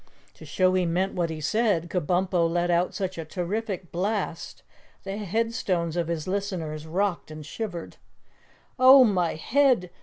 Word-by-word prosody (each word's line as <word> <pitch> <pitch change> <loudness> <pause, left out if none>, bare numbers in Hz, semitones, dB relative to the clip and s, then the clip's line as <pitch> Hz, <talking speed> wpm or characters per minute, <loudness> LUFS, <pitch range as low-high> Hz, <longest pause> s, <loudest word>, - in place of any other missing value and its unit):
To - - -13
show 185 -1 +2
he 185 -1 +2
meant 185 +3 0
what 175 -2 -1
he 160 -1 -5
said, 190 0 +1
Kabumpo 180 0 +1
let 175 +1 0
out 175 +1 +1
such 190 -3 -3
a - - -3
terrific 185 +2 -4
blast 190 -2 -3 0.4
the 195 +1 -5
headstones 200 -5 -1
of 170 -2 -1
his 165 -1 -3
listeners 180 -6 -3
rocked 185 +1 -1
and 155 -1 -9
shivered. 175 -1 -6 0.8
"Oh, 260 +1 +9
my 185 -7 +1
head! 245 - +2
180 Hz, 150 wpm, -26 LUFS, 170-205 Hz, 0.8 s, Oh